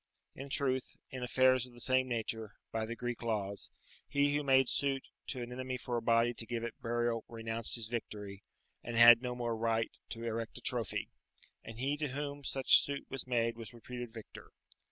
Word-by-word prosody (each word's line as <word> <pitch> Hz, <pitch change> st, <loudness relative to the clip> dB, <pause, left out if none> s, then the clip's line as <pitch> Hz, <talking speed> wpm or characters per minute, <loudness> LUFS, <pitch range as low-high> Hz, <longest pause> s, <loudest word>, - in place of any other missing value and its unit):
In 135 Hz, +1 st, -8 dB
truth, 130 Hz, -2 st, 0 dB
in 130 Hz, -, -5 dB
affairs 130 Hz, 0 st, +4 dB
of 125 Hz, -, -16 dB
the 120 Hz, -, -13 dB
same 130 Hz, +1 st, +2 dB
nature, 110 Hz, -2 st, -3 dB, 0.2 s
by 110 Hz, -1 st, -1 dB
the 115 Hz, -, -4 dB
Greek 120 Hz, 0 st, -4 dB
laws, 105 Hz, -4 st, -2 dB, 0.4 s
he 145 Hz, 0 st, +2 dB
who 150 Hz, -, +2 dB
made 135 Hz, -2 st, +5 dB
suit 135 Hz, 0 st, 0 dB, 0.2 s
to 125 Hz, -3 st, -2 dB
an 120 Hz, -, -7 dB
enemy 130 Hz, 0 st, -3 dB
for 125 Hz, 0 st, -3 dB
a 120 Hz, -, 0 dB
body 115 Hz, +1 st, +3 dB
to 115 Hz, -, -7 dB
give 120 Hz, 0 st, -2 dB
it 120 Hz, -1 st, -3 dB
burial 120 Hz, -1 st, 0 dB
renounced 115 Hz, 0 st, -3 dB
his 115 Hz, -2 st, -3 dB
victory, 105 Hz, -4 st, -5 dB, 0.4 s
and 120 Hz, -, -4 dB
had 115 Hz, 0 st, +10 dB
no 125 Hz, -1 st, -3 dB
more 120 Hz, -2 st, -1 dB
right 115 Hz, 0 st, +1 dB, 0.2 s
to 115 Hz, -1 st, -5 dB
erect 115 Hz, 0 st, -3 dB
a -, -, -6 dB
trophy, -, -, -2 dB, 0.5 s
and 115 Hz, 0 st, -9 dB
he 140 Hz, +4 st, 0 dB
to 150 Hz, 0 st, -1 dB
whom 145 Hz, +1 st, -4 dB
such 135 Hz, 0 st, +5 dB
suit 140 Hz, -1 st, -4 dB
was 135 Hz, -1 st, -4 dB
made 115 Hz, -2 st, +1 dB
was 115 Hz, +1 st, -9 dB
reputed 120 Hz, 0 st, -7 dB
victor. 110 Hz, -2 st, -11 dB
120 Hz, 195 wpm, -34 LUFS, 115-130 Hz, 0.5 s, had